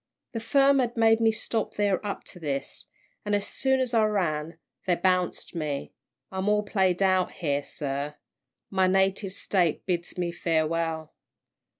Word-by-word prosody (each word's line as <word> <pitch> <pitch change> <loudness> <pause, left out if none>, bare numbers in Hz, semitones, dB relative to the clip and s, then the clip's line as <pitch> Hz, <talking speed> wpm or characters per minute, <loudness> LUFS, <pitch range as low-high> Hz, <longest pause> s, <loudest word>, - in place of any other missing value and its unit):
The 230 - -3
firm 275 +4 +4
had 240 -2 0
made 225 0 +5
me 225 -1 +4
stop 220 0 -3
there 205 -2 +1
up 205 -1 -4
to 180 - -12
this, 140 -4 -4 0.4
an' 205 0 +1
as 205 0 -1
soon 265 -1 +1
as 255 -2 -1
I 225 -2 +4
ran, 165 -6 -1 0.3
they 180 - +4
bounced 180 0 0
me 150 -4 -3 0.4
I'm 190 +1 -1
all 210 0 +3
played 190 -2 +1
out 185 -1 +2
here, 145 -4 -1
sir. 140 0 -4 0.6
My 190 -1 +3
native 195 +1 +1
State 180 -5 +1
bids 175 -2 -2
me 175 -1 -1
farewell!" 165 -1 -1
185 Hz, 160 wpm, -27 LUFS, 165-210 Hz, 0.6 s, made